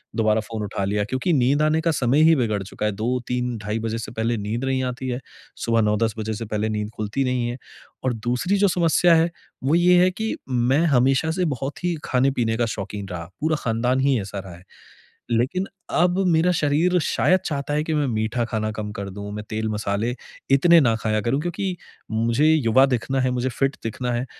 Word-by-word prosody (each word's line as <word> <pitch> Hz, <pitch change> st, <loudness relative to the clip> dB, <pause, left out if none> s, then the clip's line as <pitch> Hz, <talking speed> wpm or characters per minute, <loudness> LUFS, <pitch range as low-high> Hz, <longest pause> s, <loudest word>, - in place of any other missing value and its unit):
दोबारा 110 Hz, -1 st, +2 dB
फ़ोन 110 Hz, -1 st, -5 dB
उठा 100 Hz, -1 st, -3 dB
लिया। 105 Hz, +1 st, 0 dB
क्योंकि 130 Hz, -, -1 dB
नींद 140 Hz, +1 st, +3 dB
आने 155 Hz, +1 st, +2 dB
का 165 Hz, -, +1 dB
समय 135 Hz, 0 st, +2 dB
ही 165 Hz, -, +6 dB
बिगड़ 110 Hz, -5 st, 0 dB
चुका 105 Hz, +2 st, -5 dB
है, -, -, 0 dB
2-3 125 Hz, +2 st, -2 dB
ढाई 105 Hz, +2 st, -3 dB
बजे 115 Hz, 0 st, -2 dB
से -, -, -6 dB
पहले 115 Hz, +1 st, -1 dB
नींद 110 Hz, +5 st, -3 dB
नहीं 130 Hz, -1 st, 0 dB
आती 125 Hz, +1 st, -4 dB
है। 125 Hz, -, -2 dB, 0.5 s
सुबह 115 Hz, -1 st, +2 dB
9-10 105 Hz, +1 st, +1 dB
बजे 110 Hz, 0 st, -2 dB
से 115 Hz, +2 st, -5 dB
पहले 105 Hz, +1 st, -2 dB
नींद 105 Hz, -1 st, -2 dB
खुलती 110 Hz, +6 st, -1 dB
नहीं 125 Hz, -2 st, 0 dB
है। 120 Hz, -, -5 dB, 0.5 s
और 130 Hz, -, +1 dB
दूसरी 125 Hz, -, -1 dB
जो 200 Hz, 0 st, +4 dB
समस्या 175 Hz, -1 st, +3 dB
है 165 Hz, +1 st, +3 dB, 0.3 s
वो 145 Hz, +4 st, +2 dB
ये 180 Hz, +1 st, +5 dB
है 185 Hz, -, +4 dB
कि 220 Hz, +4 st, -3 dB
मैं 125 Hz, +3 st, +2 dB
हमेशा 135 Hz, +3 st, +3 dB
से 180 Hz, +1 st, 0 dB
बहुत 140 Hz, +2 st, -4 dB
ही 175 Hz, -1 st, 0 dB
खाने-पीने 125 Hz, -3 st, +1 dB
का 120 Hz, -, +2 dB
शौक़ीन 100 Hz, -1 st, -6 dB
रहा, 85 Hz, -2 st, -5 dB, 0.2 s
पूरा 155 Hz, +1 st, +1 dB
खानदान 125 Hz, +2 st, 0 dB
ही 135 Hz, -2 st, +2 dB
ऐसा 100 Hz, +1 st, -6 dB
रहा 95 Hz, -2 st, -9 dB
है। 90 Hz, -, -16 dB, 0.7 s
लेकिन 130 Hz, +12 st, +1 dB, 0.3 s
अब 180 Hz, +1 st, +3 dB
मेरा 170 Hz, +1 st, +3 dB
शरीर 165 Hz, +3 st, +2 dB
शायद 185 Hz, +4 st, +2 dB
चाहता 145 Hz, -1 st, -2 dB
है 150 Hz, -, +1 dB
कि 160 Hz, -, -1 dB
मैं 145 Hz, -2 st, +1 dB
मीठा 115 Hz, +1 st, -1 dB
खाना 110 Hz, -1 st, -2 dB
कम 105 Hz, -1 st, -5 dB
कर 100 Hz, -1 st, -5 dB
दूँ, 100 Hz, +1 st, -7 dB
मैं 105 Hz, 0 st, -5 dB
तेल, 110 Hz, 0 st, -2 dB
मसाले 105 Hz, +3 st, -1 dB, 0.4 s
इतने 170 Hz, +5 st, +6 dB
ना 115 Hz, -4 st, +3 dB
खाया 110 Hz, -1 st, 0 dB
करूँ 120 Hz, +6 st, 0 dB
क्योंकि 175 Hz, +2 st, -3 dB, 0.3 s
मुझे 115 Hz, +6 st, +1 dB
युवा 130 Hz, -3 st, +4 dB
दिखना 135 Hz, +1 st, -1 dB
है, 130 Hz, 0 st, +1 dB
मुझे 125 Hz, +1 st, -1 dB
फिट 135 Hz, +3 st, -1 dB
दिखना 120 Hz, +2 st, -3 dB
है, 120 Hz, +2 st, -1 dB
125 Hz, 210 wpm, -23 LUFS, 110-145 Hz, 0.7 s, ही